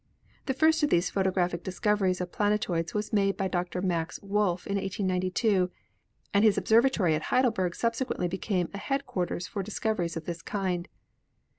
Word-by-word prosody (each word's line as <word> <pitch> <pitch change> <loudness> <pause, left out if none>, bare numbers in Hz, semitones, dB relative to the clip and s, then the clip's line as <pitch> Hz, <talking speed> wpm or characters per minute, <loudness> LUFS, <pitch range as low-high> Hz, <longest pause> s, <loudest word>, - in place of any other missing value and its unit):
The 265 - 0
first 320 +3 +4
of 295 - +3
these 175 +1 +2
photographic 180 -3 0
discoveries 190 -1 +1
of 180 -1 -4
planetoids 205 -6 0
was 210 +1 -2
made 195 -2 +2
by 195 - 0
Dr. 180 0 -2
Max 170 -3 -1
Wolf 200 -3 0
in 200 - -1
1892, 185 0 0 0.6
and 200 +1 +4
his 215 -2 +5
ob - - 0
servatory 225 -7 +4
at 155 - -2
Heidelberg 220 -9 +2
subsequently 230 -5 -1
became 185 0 -1
a 200 - -5
headquar 275 -11 -1
ters 175 - -4
for 200 - -4
discoveries 195 -4 -2
of 160 - -6
this 170 -1 -5
kind. 185 -3 -2
190 Hz, 165 wpm, -28 LUFS, 180-210 Hz, 0.6 s, his